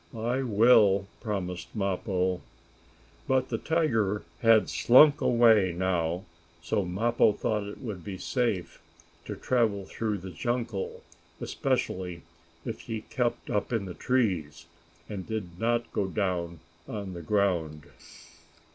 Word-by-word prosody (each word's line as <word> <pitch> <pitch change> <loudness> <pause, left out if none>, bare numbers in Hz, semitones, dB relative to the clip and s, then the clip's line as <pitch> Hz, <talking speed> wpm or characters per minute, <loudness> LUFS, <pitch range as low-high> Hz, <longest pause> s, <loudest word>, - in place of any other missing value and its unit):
"I 120 +4 -1
will," 105 -4 +5 0.2
promised 90 -4 -4
Mappo. 95 -2 -1 0.9
But 130 -1 +1
the 115 - -2
tiger 115 - +1 0.2
had 115 -1 +5
slunk 145 +4 +6
away 110 -7 +4
now, 90 -1 0 0.4
so 85 +5 -1
Mappo 105 +4 +2
thought 105 0 -1
it 105 - -9
would 100 -8 -5
be 95 0 -6
safe 100 -7 -2 0.4
to - - -5
travel 110 -6 0
through 105 +1 -2
the 95 0 -8
jungle, 115 +1 -3 0.4
especially 90 -2 -2 0.4
if 110 - -4
he 110 -2 -5
kept 120 -2 -1
up 105 +3 -1
in 115 -4 0
the 90 - -6
trees, 85 - -1 0.4
and 100 -3 -6
did 95 -6 -5
not 120 +1 0
go 100 - 0
down 90 -4 -2 0.3
on 100 -3 -5
the 85 - -7
ground. 85 -6 0
100 Hz, 125 wpm, -28 LUFS, 90-115 Hz, 0.9 s, slunk